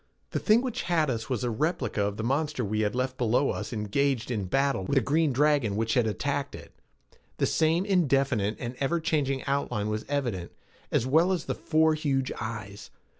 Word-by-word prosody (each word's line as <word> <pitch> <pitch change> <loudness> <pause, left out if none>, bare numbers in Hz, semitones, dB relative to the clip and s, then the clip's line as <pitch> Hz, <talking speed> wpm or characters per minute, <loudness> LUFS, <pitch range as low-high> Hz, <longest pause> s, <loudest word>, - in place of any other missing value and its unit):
The - - -1
thing 225 +3 +4
which 255 -4 -2
had 160 -5 +1
us 115 0 -4
was 125 -4 -1
a 120 - 0
replica 135 - -1
of 100 0 -2
the 110 - -3
monster 140 +1 0
we 105 +2 -1
had 105 +1 0
left 130 +1 -2
below 125 +3 +2
us - - -5
engaged 120 +3 0
in 105 -5 -1
battle 135 +1 +1
with 115 - -1
the 135 - +5
green 150 +5 +2
dragon 140 -5 +2
which 110 +1 0
had 120 -3 +2
attacked 140 +5 -2
it. - - -11 0.7
The - - +2
same 165 +3 +2
indefinite 135 - +1
and 120 0 -4
ever 140 +5 +1
changing 145 -5 -1
outline 125 -7 -1
was 110 0 -3
evident, 120 -12 -2 0.4
as - - +1
well 160 +8 +3
as 185 - -1
the - - -1
four 160 0 +2
huge 140 -4 -1
eyes. 105 -3 -6
135 Hz, 195 wpm, -27 LUFS, 110-150 Hz, 0.7 s, the